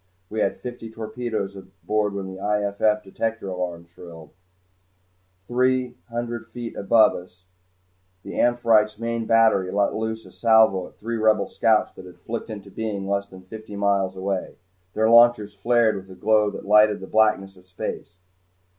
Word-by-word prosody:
We 110 - -3
had 100 - 0
fifty 120 -2 -8
torpedoes 110 -2 -4
aboard 95 +2 -3
when 100 -1 -4
the 95 0 -8
I.F.F. 105 +1 0
detector 115 +3 -4
shrilled 90 -2 -5
alarm. 80 -3 -11 1.2
Three 130 0 +1 0.2
hundred 120 0 -4
feet 120 -2 -7
above 110 +2 +4
us 90 0 -11 0.8
the - - -8
"Amphitrite's" 115 -3 +2
main 115 0 -3
battery 110 -5 +3
let 100 0 +1
loose 110 0 -4
a - - -14
salvo 110 -5 +3
at - - -19
three 115 +2 -4
Rebel 110 -2 +3
scouts 110 -2 +2
that 95 - -12
had 90 - -14
flickered 115 0 -6
into 100 -2 -8
being 100 -3 -4
less 100 0 -1
than 95 -1 -14
fifty 110 +2 -10
miles 100 -2 0
away. 95 0 -3 0.4
Their 110 0 +2
launchers 115 -3 +5
flared 115 +2 +2
with 95 0 -10
a 95 -1 -13
glow 105 -1 +3
that 100 - -8
lighted 105 +1 +5
the 95 - -8
blackness 105 -2 +1
of 90 0 -21
space. 90 -1 -6
105 Hz, 160 wpm, -23 LUFS, 95-115 Hz, 1.2 s, launchers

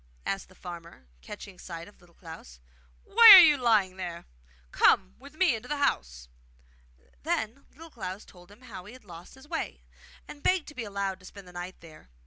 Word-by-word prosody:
asked 195 -1 -4
the 185 - -20
farmer, 170 - -11 0.2
catching 200 -3 -11
sight 170 -2 -9
of 205 - -19
Little 175 -1 -23
Klaus. 160 - -13 0.4
'Why 460 +1 +7
are - - +12
you 305 -3 +5
lying 215 -8 +1
there? 175 -2 -7 0.5
Come 190 -1 +3
with 280 +3 -15
me 355 -4 +2
into 225 +3 -9
the 295 - -2
house.' 60 - -2 0.9
Then 225 - -4
Little 325 +2 -15
Klaus 195 -4 -8
told 180 0 -18
him 205 +4 -18
how 205 -8 -11
he 210 - -12
had 255 -4 -16
lost 175 +2 -13
his 265 +2 -17
way, - - -5 0.4
and 290 - -12
begged 365 -2 +1
to - - -13
be 255 -5 -6
allowed 200 -2 -4
to 185 - -18
spend 200 -2 -13
the 180 - -15
night 175 +1 -8
there. 160 - -16
195 Hz, 195 wpm, -27 LUFS, 175-255 Hz, 0.9 s, are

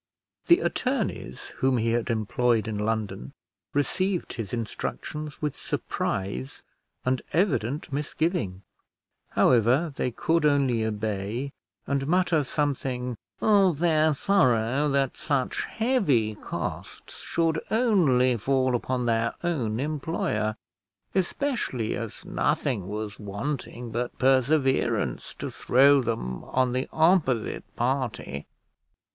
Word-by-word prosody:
The 345 +4 +6
attorneys 245 - -2
whom 130 -1 +2
he 115 0 +1
had 115 0 0
employed 115 +1 +1
in 105 -2 -3
London 105 - -2 0.4
received 185 +6 0
his 115 -5 -5
instructions 145 +6 -4
with 150 -2 -1
surprise 70 -10 -3 0.4
and 130 0 +1
evident 150 - 0
misgiving; 150 - -1 0.7
however, 130 +7 +4
they 125 - 0
could 160 +7 +1
only 135 -6 +3
obey, 110 +4 -2 0.3
and 140 -1 -1
mutter 175 -2 +3
something 130 -3 -2 0.3
of 195 -7 +4
their 160 -1 +3
sorrow 135 - +2
that 140 -2 +1
such 145 -4 -1
heavy 185 - +1
costs 105 - -6
should 165 -1 0
only 160 - +3
fall 130 +2 +1
upon 125 +1 -1
their 115 0 +1
own 125 -11 -1
employer, 135 -7 -1 0.6
especially 190 - -1
as 115 -3 -6
nothing 105 -10 0
was 105 +1 -5
wanting 115 +3 -4
but 120 +2 -3
perseverance 130 - +2
to - - -5
throw 140 +2 +5
them 110 - -3
on 130 -1 +1
the 130 +1 -1
opposite 160 - +2
party. 120 - -2
130 Hz, 105 wpm, -26 LUFS, 115-155 Hz, 0.7 s, The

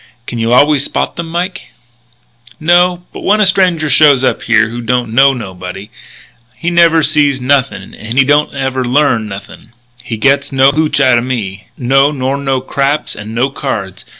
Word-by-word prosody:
"Can 120 - -6
you 115 +1 -1
always 145 +3 +4
spot - - -3
them, 170 -1 -5
Mike?" 175 +3 -3 1.0
"No. 175 +2 +2
But - - -8
when 210 +2 +1
a 210 - +4
stranger 180 -4 +1
shows 145 -3 +4
up - - 0
here 110 -2 +2
who 120 +1 -6
don't 120 -1 -2
know 135 +3 +5
nobody, 95 -2 -8 0.6
he 165 +7 -3
never 165 -2 +4
sees 145 -3 +2
nothing 135 +1 -1
and 115 +3 -7
he 135 - +5
don't 145 +2 +2
never 135 -1 -3
learn 125 -3 +1
nothing. 100 +3 -11 0.3
He 115 -2 -5
gets 140 +4 +1
no 135 0 +4
hootch 150 0 0
outa 130 -3 +3
me. 110 -7 -5
No, 135 +3 +2
nor 135 -1 -2
no 135 -2 -1
craps 140 +3 -2
and 110 +1 -8
no 130 +3 0
cards. 100 -10 -5
135 Hz, 175 wpm, -13 LUFS, 120-150 Hz, 1.0 s, know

